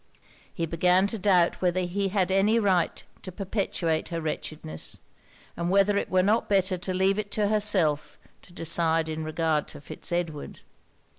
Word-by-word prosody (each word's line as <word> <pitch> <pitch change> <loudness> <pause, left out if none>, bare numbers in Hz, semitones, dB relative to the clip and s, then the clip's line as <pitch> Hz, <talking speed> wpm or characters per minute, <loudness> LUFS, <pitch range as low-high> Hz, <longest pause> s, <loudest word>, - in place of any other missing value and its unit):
He 170 - -3
began 180 +3 +2
to 215 +2 -3
doubt 180 -3 +2
whether 185 0 +1
he 190 +3 -1
had 190 -1 0
any 200 +4 +3
right 190 -6 +1 0.2
to 185 - -8
perpetuate 180 -4 -2
her 170 -1 -3
wretchedness; 155 - -5 0.6
and 170 0 -2
whether 200 +2 +3
it - - -1
were 185 0 +3
not 215 +4 +1
better 190 -2 +2
to 180 +1 -5
leave 190 +2 +1
it 205 -1 -4
to 210 -2 +1
herself 200 -8 +1 0.2
to - - -18
decide 165 -1 +1
in 160 0 -4
regard 155 -1 -1
to - - -10
Fitz 145 - -4
Edward. 170 -4 -4
180 Hz, 165 wpm, -26 LUFS, 165-195 Hz, 0.6 s, any